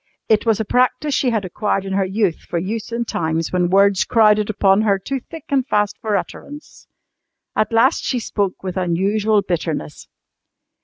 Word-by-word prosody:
It 220 +1 +2
was 220 -1 +3
a 220 - -1
practice 255 +6 +1
she 260 - +1
had 220 -4 -1
acquired 195 +1 -2
in 195 - -4
her 195 0 +2
youth 190 -2 0
for 175 - -5
use 210 +6 -4
in 235 0 -2
times 160 -4 -2
when 180 -1 +1
words 195 0 +4
crowded 215 -2 +3
upon 195 -1 +3
her 205 -2 +2
too 270 +8 -4
thick 320 +4 -11
and 275 -2 +2
fast 210 -4 +1
for 215 -3 -1
utterance. 295 +7 -9 0.7
At 215 - 0
last 235 +6 +3
she 255 - -1
spoke 205 -5 -2
with 185 -1 -4
unusual 200 +4 +1
bitterness. 160 - -4
210 Hz, 175 wpm, -19 LUFS, 190-230 Hz, 0.7 s, words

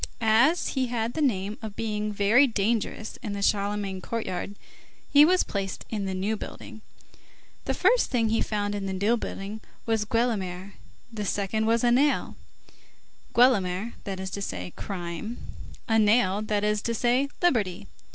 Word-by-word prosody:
As 235 +9 +3
he 260 -2 0
had 235 -1 -2
the 315 - -2
name 210 -6 0
of 215 -3 -7
being 210 -1 -2
very 210 +7 +4
dangerous 220 0 -1
in 210 -5 -4
the 200 0 -3
Charlemagne 200 -2 0
courtyard, 205 -2 -4 0.6
he 290 +1 +9
was 360 +4 +4
placed 195 -2 -4
in 210 -3 -2
the 190 -1 -2
New 200 +4 -1
Building. 220 +1 -9 0.8
The - - -1
first - - +3
thing 230 -4 +1
he 225 - +1
found 205 -1 -1
in 200 -1 -3
the 190 - -2
New 205 +5 +2
Building 215 -1 -6 0.2
was 225 -2 +1
Guelemer, 200 -5 -1 0.4
the 210 -2 -3
second 205 +2 -1
was 230 +1 +2
a 240 - +4
nail; 280 +4 +2 1.0
Guelemer, 220 -4 +3
that 195 -2 -4
is 190 0 -5
to 200 - -4
say, 90 - -5
crime; 185 +4 -5 0.5
a 225 -1 +3
nail, 210 -2 +3
that 210 -1 -1
is 210 0 +1
to 230 +1 -2
say, 250 +4 +2
liberty. 210 - +1
215 Hz, 160 wpm, -26 LUFS, 200-235 Hz, 1.0 s, he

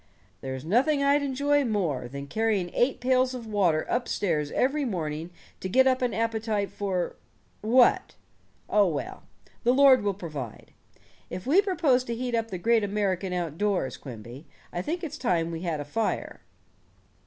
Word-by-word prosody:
"There's 130 +1 -5
nothing 275 - +2
I'd 285 +1 +4
enjoy 285 +1 +1
more 175 - -1
than 140 +3 -7
carrying 200 +1 -1
eight 250 +3 +1
pails 255 0 +2
of 240 -2 -7
water 190 -8 +1
up 245 0 -1
stairs 155 -7 -1
every 285 +3 +1
morning 165 - -3 0.3
to 185 - -4
get 260 +7 +5
up 260 0 +2
an 250 -1 +1
appetite 220 -2 -1
for 190 -3 -2 0.4
what? 240 +3 +3 0.5
Oh, 205 -2 +4
well, 155 -5 -4 0.4
the 245 +2 +3
Lord 270 -3 +7
will 200 -2 -1
provide. 150 - -7 0.6
If 180 - -6
we 320 +10 +5
propose 320 -11 +2
to 235 - -3
heat 245 +1 -3
up 230 -1 0
the 185 - -4
great 225 +4 +2
American 195 -2 -1
outdoors, 180 -1 -1
Quimby, 120 +3 -10 0.3
I 175 - -2
think 335 - -3
it's 320 - -5
time 170 -8 0
we 165 0 -5
had 170 -4 -2
a 145 - -4
fire." 220 +10 -2
210 Hz, 165 wpm, -27 LUFS, 170-255 Hz, 0.6 s, Lord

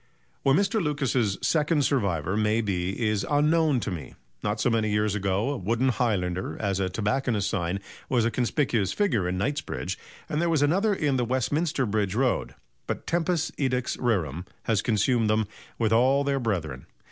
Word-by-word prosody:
Where 135 - +4
Mr. 200 +3 +2
Lucas's 135 - 0
second 150 -2 +2
survivor 95 - 0
may 110 +1 +2
be 95 -3 -2
is 105 -1 0
unknown 150 -1 +3
to 105 - -3
me. 85 -4 -7 0.3
Not 105 +1 -1
so 120 - +2
many 110 -1 +1
years 105 0 +1
ago 100 +5 0
a 145 - -2
wooden 115 +7 +1
highlander, 95 -8 -1
as 100 -2 -1
a 95 -1 0
tobacconist's 105 +2 0
sign, 90 +1 -1 0.3
was 120 -4 +2
a 115 - +1
conspicuous 120 - 0
figure 115 - +1
in 90 - -2
Knightsbridge, 110 - -3 0.3
and 150 - -1
there 170 - +1
was 155 -3 +2
another 195 +9 +2
in 150 -8 +1
the 125 - +1
Westminster 130 +4 0
Bridge 105 -2 -1
Road; 130 +1 0 0.3
but - - -4
tempus 170 -1 0
edax 130 -3 0
rerum 90 - 0 0.2
has 110 -3 +1
consumed 115 0 +2
them 110 0 +2 0.3
with 110 -1 +1
all 130 +5 +4
their 140 -1 0
brethren. 85 - -3
115 Hz, 170 wpm, -26 LUFS, 100-140 Hz, 0.3 s, Where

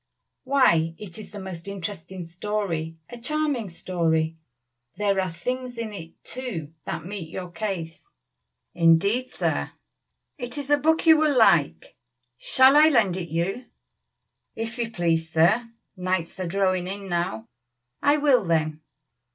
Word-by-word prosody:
Why 170 -13 +3
it 205 -2 -9
is 215 - -10
a - - -5
most 190 -2 -7
interesting 190 -2 -6
story 170 -3 -3
a 240 - -8
charming 285 -4 -1
story. 165 -2 0 0.6
There 200 -2 +2
are 185 - -2
things 250 +8 -4
in 225 -2 -4
it, 165 -4 -9
too, 195 - -6
that 165 -1 -4
meet 190 -4 -6
your 180 +1 -6
case.'" 180 - -5 0.6
"Indeed, 190 +9 +3
sir." - - -2 0.7
"It 245 +2 -5
is 285 0 -4
a 290 - +6
book 320 +3 +2
you 320 -1 +8
will 305 -3 +2
like. 170 -10 +3 0.4
Shall 260 +2 +5
I 305 +1 +8
lend 210 - +3
it 175 -3 -5
you?" 180 +10 -2 0.9
"If 225 +2 -5
you 235 -1 -1
please, 165 -5 0
sir. 175 +9 +3 0.3
Nights 185 -1 -2
are 185 - -2
drawing 185 0 +1
in 200 +1 -6
now." 170 -11 -2 0.5
"I 290 +1 +4
will, 280 -6 +4
then." 155 -3 0
190 Hz, 145 wpm, -25 LUFS, 170-240 Hz, 0.9 s, you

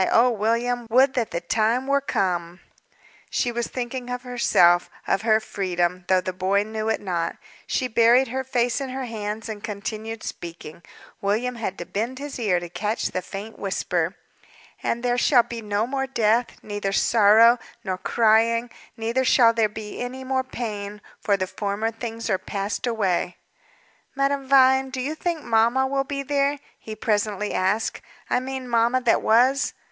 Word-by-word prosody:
Oh, 245 +2 +5
William! 235 +2 0
Would 260 +4 +4
that 240 -4 -1
the 170 - -3
time 225 +7 +1
were 280 +1 +2
come!" 180 -8 -1 0.7
She 245 - 0
was 235 0 -2
thinking 250 0 -5
of 250 0 -4
herself 180 -8 +3 0.2
of 195 - +1
her 220 -1 +3
freedom 180 -4 -2
though 185 -1 +3
the 185 - -4
boy 190 +2 +1
knew 220 +1 -3
it 220 - +1
not. 175 -4 -2 0.3
She 255 - 0
buried 235 +2 +4
her 265 +2 -2
face 250 0 0
in 270 - -4
her 260 0 -4
hands 215 -1 -5
and 215 -2 -7
continued 215 +2 -5
speaking; 170 -1 -8 0.4
William 220 +5 0
had 220 -5 -4
to 175 - -6
bend 230 +8 -3
his 285 -1 -6
ear 200 -6 +2
to 175 - -7
catch 210 +5 -2
the 185 - -2
faint 200 +4 -8
whisper. 180 -2 -1 0.7
"'And 235 +1 -2
there 245 0 +1
shall 245 -1 +5
be 235 -1 -7
no 210 0 -1
more 270 +1 -2
death, 235 -2 +2 0.2
neither 205 -2 -3
sorrow, 225 +3 +5 0.2
nor 185 -2 -3
crying: 230 +2 +2 0.3
neither 230 +3 0
shall 235 -2 +5
there 225 -2 +2
be 210 0 -8
any 255 +2 -5
more 260 0 0
pain; 210 -5 -6 0.2
for 200 -1 +1
the 185 - -1
former 205 +3 -2
things 230 0 -6
are 190 -4 +1
passed 200 +5 -3
away.'" 190 -6 0 0.8
"Madame 275 0 0
Vine, 265 0 +5
do 260 0 -5
you 275 +4 -2
think 330 0 -3
mamma 235 +4 +3
will 270 +1 0
be 275 0 -4
there?" 280 +1 +1 0.2
he 220 - -8
presently 210 -1 -1
asked. 195 +4 0 0.3
"I - - +3
mean 260 0 -5
mamma 235 +1 +2
that 240 -2 +3
was." 260 +5 +3
225 Hz, 170 wpm, -24 LUFS, 205-250 Hz, 0.8 s, Oh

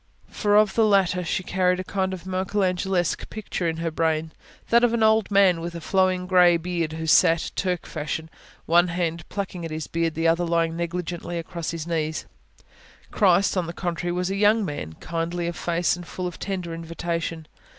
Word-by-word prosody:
For 205 -1 +1
of 210 -2 +5
the 225 - +3
latter 190 -4 +3
she 190 +3 -2
carried 180 0 +1
a - - -2
kind 190 0 -1
of 185 -1 -7
Michelangelesque 185 -1 -1
picture 205 -4 -3
in 165 -1 -1
her 165 0 -2
brain: 160 0 0 0.4
that 235 +1 +5
of 235 -1 +3
an 225 - +1
old, 220 -1 +4
old - - -28
man 195 -4 +4
with 170 +1 -5
a - - -4
flowing 185 +1 +1
grey 180 -2 +5
beard, 170 -2 -2
who 160 0 -4
sat, 165 +1 +4
Turk 180 -3 -1
fashion, 155 +1 -4 0.4
one 175 +2 +4
hand 170 -2 -3
plucking 190 -3 -4
at 165 - -4
this 155 0 -4
beard, 165 -1 -1
the 165 +1 +1
other 165 +2 +3
lying 165 -1 +1
negligently 175 0 -4
across 170 0 -5
His 165 -2 -4
knees. 160 -2 -2 0.9
Christ, 195 -1 +3
on 180 -3 0
the 170 - -5
contrary, 175 0 -3
was 180 +1 -1
a - - -1
young 210 +1 +3
man, 145 - -5
kindly 170 - -3
of 170 0 -3
face, 175 0 0
and 175 -1 -10
full 185 - -5
of 175 -1 -5
tender 185 -4 -4
invitation. 165 -1 -4
175 Hz, 195 wpm, -24 LUFS, 165-185 Hz, 0.9 s, of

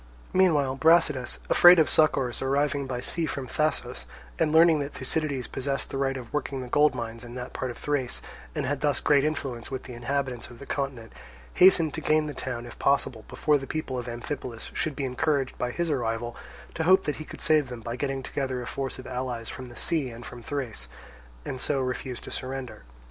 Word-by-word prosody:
Meanwhile 150 -8 +3
Brasidas, 150 -5 +4
afraid 175 +1 +8
of 160 - +5
succours 135 -6 +2
arriving 140 +1 +1
by 125 -2 -3
sea 165 +4 -1
from 135 -3 -3
Thasos, 150 - -1 0.3
and 150 - +3
learning 160 0 +6
that 140 0 -4
Thucydides 135 -1 -1
possessed 135 +1 -3
the - - -2
right 135 -1 +1
of 120 -3 -9
working 140 -2 -2
the 125 - -6
gold 145 +2 +4
mines 115 -1 -5
in 120 0 -9
that 125 -1 -6
part 130 - -3
of 120 - -7
Thrace, 140 -4 -1 0.4
and - - -1
had 145 +1 -1
thus 145 -1 +2
great 140 -2 +4
influence 135 -6 -2
with 130 -1 -4
the 125 - -9
inhabitants 125 0 -2
of 120 - -12
the 140 - -10
continent, 135 -6 -3 0.4
hastened 170 -4 +6
to - - -4
gain 155 0 +3
the 150 - -4
town, 125 -3 -4
if 120 - -11
possible, 130 -5 +1
before 150 -1 +2
the 135 - -7
people 155 -3 -3
of 120 - -6
Amphipolis 120 0 -5
should 155 -3 -1
be 140 - -2
encouraged 135 +1 0
by 125 - 0
his 170 +5 -1
arrival 120 -3 -1 0.4
to - - -3
hope 190 +3 +6
that 150 - -2
he 155 - -6
could - - -10
save 155 -3 +3
them 120 -2 -7
by 115 +1 -4
getting 135 0 -2
together 130 -1 -2
a 120 - -5
force 135 +2 -3
of 130 - -9
allies 125 -2 -3
from 130 -1 -7
the 120 - -12
sea 150 -3 0
and 115 0 -9
from 120 +1 -9
Thrace, 130 -3 -4 0.6
and 130 - -4
so 145 -2 +1
refuse 130 -1 -3
to - - -9
surrender. 130 - -5
135 Hz, 210 wpm, -27 LUFS, 125-150 Hz, 0.6 s, afraid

